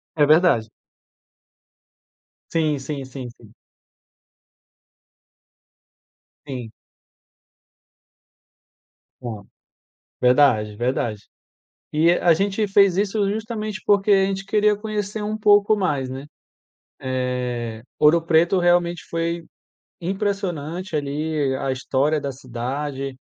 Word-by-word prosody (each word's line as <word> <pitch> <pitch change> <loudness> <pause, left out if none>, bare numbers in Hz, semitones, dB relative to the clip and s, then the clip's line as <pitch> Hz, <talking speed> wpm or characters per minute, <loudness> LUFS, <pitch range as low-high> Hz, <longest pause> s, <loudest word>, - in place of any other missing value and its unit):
É 150 - +4
verdade. 150 -8 +4 1.8
Sim, 155 -3 +1
sim, 135 0 -5
sim, 130 -1 -8
sim. 115 -2 -18 2.9
Sim. 125 -5 -6 2.5
Aham, 110 -4 -6 0.8
verdade, 125 -5 +4
verdade. 120 -3 -2 0.7
E 160 +3 +4
a 175 -1 +4
gente 200 +4 0
fez 195 -2 +4
isso 200 0 +1
justamente 215 -1 -4
porque 205 0 +3
a 195 -1 +5
gente 195 0 -3
queria 210 +1 +3
conhecer 210 0 -4
um 210 +1 -2
pouco 205 0 +4
mais, 145 -9 -1
né, 135 +2 -7 1.5
eh, - - -15 0.2
Ouro 155 +3 +6
Preto 170 +3 +3
realmente 175 -1 +2
foi 170 0 -2 0.6
impressionante 185 -3 -3
ali 145 -1 -1
a 135 - -2
história 135 +3 0
da 140 -1 -4
cidade, 135 +2 -5
160 Hz, 95 wpm, -22 LUFS, 135-195 Hz, 2.9 s, Ouro